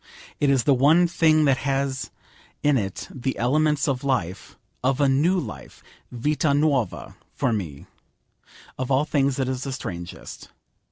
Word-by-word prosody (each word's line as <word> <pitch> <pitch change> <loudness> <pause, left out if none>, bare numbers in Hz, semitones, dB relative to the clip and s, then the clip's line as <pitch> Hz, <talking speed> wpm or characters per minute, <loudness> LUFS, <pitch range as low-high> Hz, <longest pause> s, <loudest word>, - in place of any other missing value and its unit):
It 145 - +2
is 135 -3 +3
the 140 - +4
one 150 +7 +5
thing 160 -2 +3
that 135 -2 +3
has 135 -1 -2 0.5
in 145 -1 +4
it 100 -6 -3
the 130 0 -3
elements 150 +4 +1
of 135 -2 -1
life, 100 -10 -2 0.3
of 130 +1 +1
a 140 - +4
new 155 +8 +2
life, - - -9 0.3
Vita 145 +4 0
Nuova 145 -5 0 0.2
for 130 -4 0
me. 80 -10 -5 0.9
Of 130 0 -2
all 135 +2 +2
things 140 -3 +1
it 135 -2 -1
is 130 -1 -3
the 135 - -4
strangest. 85 -10 -7
135 Hz, 155 wpm, -24 LUFS, 125-150 Hz, 0.9 s, one